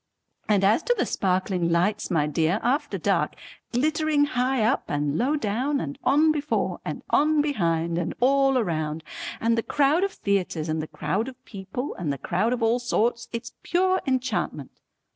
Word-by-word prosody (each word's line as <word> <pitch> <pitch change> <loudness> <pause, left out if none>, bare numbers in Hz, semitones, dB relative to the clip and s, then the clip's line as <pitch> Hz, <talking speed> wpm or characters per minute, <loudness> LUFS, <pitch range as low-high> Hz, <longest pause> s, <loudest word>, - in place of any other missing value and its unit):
And 205 -2 +3
as 210 +9 +4
to 485 +6 +1
the - - +1
sparkling 185 -2 0
lights 190 +5 +1
my 160 -5 +2
dear 160 +6 +1
after 265 +6 0
dark, - - 0 0.4
glittering 305 +3 +2
high 255 -3 0
up 220 - +1
and 145 0 -1
low 265 - +1
down 270 +3 -1
and 280 0 -5
on 300 +4 +4
before 295 -1 -1
and - - -5
on 305 +1 +3
behind 170 - 0
and 175 - -3
all 270 +1 +4
round, 155 -3 -3 0.4
and 230 +1 +2
the 230 - +1
crowd 295 +8 +2
of 395 -1 -1
theatres 180 -5 -1
and 155 0 -1
the 155 - -5
crowd 215 +9 -2
of 260 0 -11
people 200 +7 -5
and 160 -5 -1
the 140 - -3
crowd 210 - 0
of 250 -2 -1
all 230 +2 +3
sorts, 240 -1 0
it's 230 -1 -6
pure 370 +1 +1
enchantment. 260 -1 -1
235 Hz, 175 wpm, -25 LUFS, 180-280 Hz, 0.4 s, as